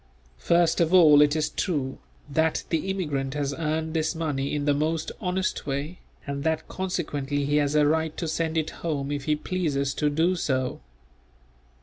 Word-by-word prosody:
First 170 - +3
of 170 +2 +3
all 150 -5 +8
it 150 0 +4
is 155 -1 0
true, 140 -7 -2 0.3
that 160 +2 +1
the 165 +3 -1
immigrant 150 -8 -2
has 145 -1 -1
earned 160 +1 -2
this 160 +1 0
money 150 -4 -2
in 145 -1 -2
the 145 - +3
most 155 +2 -1
honest 185 -4 -2
way, 145 +5 -3 0.3
and 140 -1 -4
that 160 0 -1
consequently 145 -6 -2
he 145 +1 +2
has 145 0 +1
a 150 -1 +5
right 160 +1 0
to 170 - -2
send 160 +1 -1
it 155 -1 0
home 145 -4 -2
if 145 -2 -3
he 150 - +2
pleases 150 -5 -1
to 150 +1 +1
do 165 +5 +2
so. 130 - -1
155 Hz, 180 wpm, -26 LUFS, 145-165 Hz, 0.3 s, all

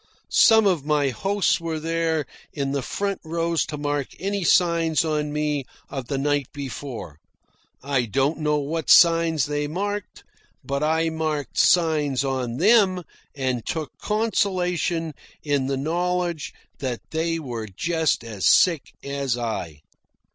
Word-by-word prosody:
Some 220 -2 +7
of 180 -7 +2
my 145 -2 +1
hosts 195 - 0
were 165 -1 -3
there 165 -1 0 0.3
in 140 -2 -2
the 140 0 -1
front 200 +9 -3
rows 165 0 -1
to 150 - -5
mark 145 -1 -1
any 200 0 -2
signs 170 -2 +3
on 150 -1 -1
me 150 -1 -1 0.3
of 135 -3 -5
the 140 - -2
night 145 -1 0
before. 130 - -7 0.6
I 135 -3 0
don't 135 +8 0
know 150 -1 +1
what 150 +2 -3
signs 165 -3 +6
they 145 0 -2
marked, 205 +5 -4 0.4
but 140 0 -2
I 160 +1 +1
marked 155 -2 -2
signs 150 -6 +3
on 130 -3 -2
them 190 - +4 0.3
and 130 -4 -1
took 160 -2 -4
consolation 180 -6 0 0.3
in 145 -3 0
the 135 0 -1
knowledge 175 +2 -1 0.3
that 125 -4 -3
they 165 +1 0
were 120 -8 -5
just 160 - 0
as 105 -6 0
sick 170 -6 +3
as 140 -3 -2
I. 90 -11 -4
150 Hz, 140 wpm, -24 LUFS, 140-170 Hz, 0.6 s, Some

